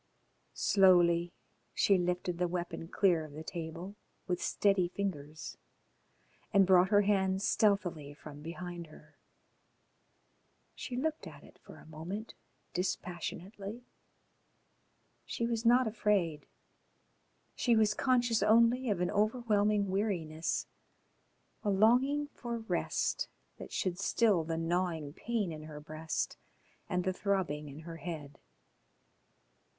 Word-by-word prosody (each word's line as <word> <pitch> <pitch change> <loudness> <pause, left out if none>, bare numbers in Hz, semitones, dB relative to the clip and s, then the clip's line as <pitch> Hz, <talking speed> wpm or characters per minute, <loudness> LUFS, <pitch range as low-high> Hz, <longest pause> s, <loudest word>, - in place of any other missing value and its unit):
Slowly 175 -3 +4 0.4
she 195 -2 +4
lifted 180 0 -1
the 180 - +2
weapon 175 -1 -4
clear 175 -3 +2
of 155 -2 -10
the 155 +2 -7
table 170 +3 -6 0.3
with 180 -1 -2
steady 195 -3 +2
fingers 160 -5 -5 0.9
and 195 -1 +6
brought 185 0 +5
her 205 0 +5
hand 190 -1 +1
stealthily 175 -11 +1
from 145 -1 -11
behind 170 +1 -6
her. 155 0 -17 1.5
She 250 - -6
looked 315 +4 -2
at - - -12
it - - -17
for - - -14
a - - -15
moment 170 +8 -6 0.4
dispassionately. 185 +4 -4 1.4
She 235 - -3
was 230 0 0
not 250 +2 +6
afraid. 200 -8 0 1.1
She 240 -2 +2
was 215 -1 +4
conscious 240 -2 +2
only 235 +3 +4
of 195 -4 0
an 180 - +1
overwhelming 210 -2 +2
weariness, 170 -6 -1 1.0
a 210 - 0
longing 250 +9 +4
for 235 -1 -4
rest 225 0 -1 0.3
that - - -9
should 180 -1 -1
still 200 -3 +3
the 165 +1 -3
gnawing 165 -3 -1
pain 220 -2 -2
in 155 -1 -7
her 150 -1 -8
breast 155 +1 -3 0.5
and 180 -2 0
the 185 0 0
throbbing 180 -7 -1
in 145 +3 -9
her 165 0 -8
head.... 155 -5 -7
185 Hz, 120 wpm, -32 LUFS, 165-210 Hz, 1.5 s, and